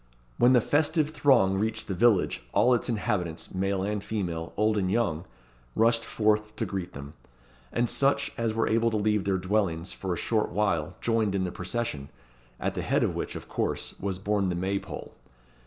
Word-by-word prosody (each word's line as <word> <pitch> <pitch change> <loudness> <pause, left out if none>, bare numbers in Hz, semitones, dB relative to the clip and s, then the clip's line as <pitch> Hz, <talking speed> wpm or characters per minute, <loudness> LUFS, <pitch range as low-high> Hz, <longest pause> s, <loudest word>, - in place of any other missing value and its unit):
When 125 +2 +6
the 125 - +6
festive 150 +3 +1
throng 115 -11 +3
reached 110 +1 -1
the 95 - -2
village, 105 0 +3
all 125 - +4
its 120 - 0
inhabitants 95 -7 -2
male 95 0 0
and 105 0 -2
female, 85 -7 -3
old 105 +1 +2
and 95 -3 0
young 95 -7 0 0.5
rushed 115 0 +3
forth 105 -1 0
to - - -1
greet 95 -2 -4
them; 70 +1 -9 0.6
and 120 0 +1
such 140 +3 +1
as 115 -1 0
were 115 - +1
able 115 +1 +2
to 110 - -1
leave 105 -1 +1
their 95 -1 +1
dwellings 95 -3 -1
for 95 - -4
a 85 - -1
short 110 -2 0
while 90 -4 0
joined 110 -4 +1
in 95 - +1
the 90 - -2
procession, 90 -8 -3 0.5
at - - -1
the - - -3
head - - +1
of - - 0
which, - - -4
of - - -7
course, - - -2
was 95 -2 -2
borne 100 0 0
the 90 - -1
May 95 +3 -1
pole. - - -8
105 Hz, 190 wpm, -27 LUFS, 95-115 Hz, 0.6 s, When